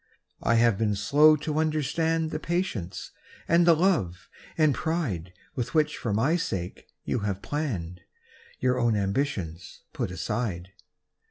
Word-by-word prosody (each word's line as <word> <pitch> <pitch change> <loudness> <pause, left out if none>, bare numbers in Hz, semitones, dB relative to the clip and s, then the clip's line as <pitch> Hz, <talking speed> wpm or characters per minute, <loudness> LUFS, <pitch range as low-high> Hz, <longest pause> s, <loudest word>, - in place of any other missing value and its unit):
I 115 - +2
have 115 -3 +3
been 105 -2 +1
slow 145 +10 +5
to 150 +1 -2
understand 160 +1 0
The 155 - -3
patience 160 - -3 0.4
and 170 +1 +4
the 170 - +7
love 150 - 0 0.3
and 155 -3 +4
pride 120 - -2 0.2
"With 120 +1 -4
which 155 -1 +2
for 115 - -3
my 135 +12 +2
sake 90 - -4 0.2
you - - -1
have 100 -2 -2 1.2
hour 125 0 +2
own 120 -2 +2
ambitions 100 - -2
put - - -2
aside. 95 -7 -3
125 Hz, 135 wpm, -27 LUFS, 100-155 Hz, 1.2 s, the